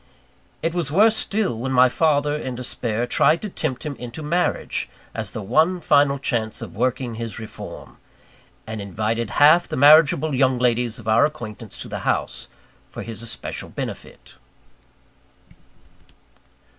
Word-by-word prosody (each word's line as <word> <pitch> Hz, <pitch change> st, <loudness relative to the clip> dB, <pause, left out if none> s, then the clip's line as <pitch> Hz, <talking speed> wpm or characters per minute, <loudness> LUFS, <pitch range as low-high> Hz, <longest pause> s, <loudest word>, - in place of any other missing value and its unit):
It 165 Hz, 0 st, 0 dB
was 170 Hz, -5 st, -2 dB
worse 215 Hz, +7 st, +5 dB
still, 200 Hz, -, -1 dB
when 130 Hz, +3 st, -3 dB
my 130 Hz, 0 st, +6 dB
father, 145 Hz, +1 st, +1 dB
in 130 Hz, -4 st, -4 dB
despair, 120 Hz, -2 st, -2 dB
tried 155 Hz, +6 st, +3 dB
to 210 Hz, -, -3 dB
tempt 150 Hz, -8 st, -4 dB
him 145 Hz, -2 st, -4 dB
into 125 Hz, +5 st, -8 dB
marriage, 175 Hz, +4 st, -1 dB, 0.2 s
as 110 Hz, -3 st, -4 dB
the 110 Hz, -2 st, -6 dB
one 160 Hz, -, +2 dB
final 145 Hz, -3 st, +3 dB
chance 115 Hz, -5 st, -2 dB
of -, -, -8 dB
working 125 Hz, +1 st, -1 dB
his 115 Hz, 0 st, -6 dB
reform; 110 Hz, -2 st, -9 dB, 0.7 s
and 110 Hz, -1 st, -6 dB
invited 110 Hz, +3 st, -2 dB
half 155 Hz, +4 st, +6 dB
the -, -, -4 dB
marriageable 150 Hz, +1 st, +6 dB
young 130 Hz, -1 st, +2 dB
ladies 120 Hz, -2 st, +1 dB
of 115 Hz, -, -12 dB
our 110 Hz, +6 st, +5 dB
acquaintance 115 Hz, -8 st, -8 dB
to -, -, -10 dB
the -, -, -5 dB
house, -, -, -2 dB, 0.4 s
for -, -, -7 dB
his 115 Hz, -1 st, -7 dB
especial 115 Hz, -, -5 dB
benefit. -, -, -8 dB
130 Hz, 145 wpm, -22 LUFS, 115-155 Hz, 0.7 s, my